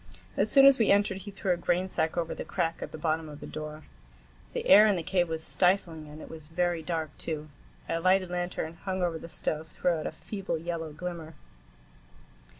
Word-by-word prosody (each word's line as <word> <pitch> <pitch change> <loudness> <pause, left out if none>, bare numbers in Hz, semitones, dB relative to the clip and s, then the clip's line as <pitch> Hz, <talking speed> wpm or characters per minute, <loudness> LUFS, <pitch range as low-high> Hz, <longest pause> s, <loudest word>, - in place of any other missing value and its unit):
As 205 - +2
soon 275 -1 +8
as 275 -2 +8
we 225 - +3
entered 200 -1 +3
he 205 - -8
threw 195 -1 -2
a 175 - +2
grainsack 175 -1 0
over 165 -1 -1
the - - -5
crack 165 -3 -2
at - - -5
the - - -7
bottom 155 0 -1
of 150 -1 -9
the - - -8
door. 155 0 -7 0.7
The - - -3
air 210 +3 +9
in 205 - +3
the 170 - -2
cave 180 -1 +1
was 160 0 -3
stifling, 175 -4 +1
and 150 +1 -10
it - - -9
was 160 -2 -10
very 175 +1 0
dark, 160 -1 -3
too. 155 -2 -3 0.4
A 165 - 0
lighted 185 +1 +3
lantern, 175 -2 -3
hung 190 -2 -1
over 165 -2 0
the 165 - -9
stove, 160 -1 -3
threw 180 - 0
out 160 -2 -1
a - - -3
feeble 195 -5 -4
yellow 165 -1 -4
glimmer. 165 0 -6
170 Hz, 210 wpm, -29 LUFS, 160-185 Hz, 0.7 s, air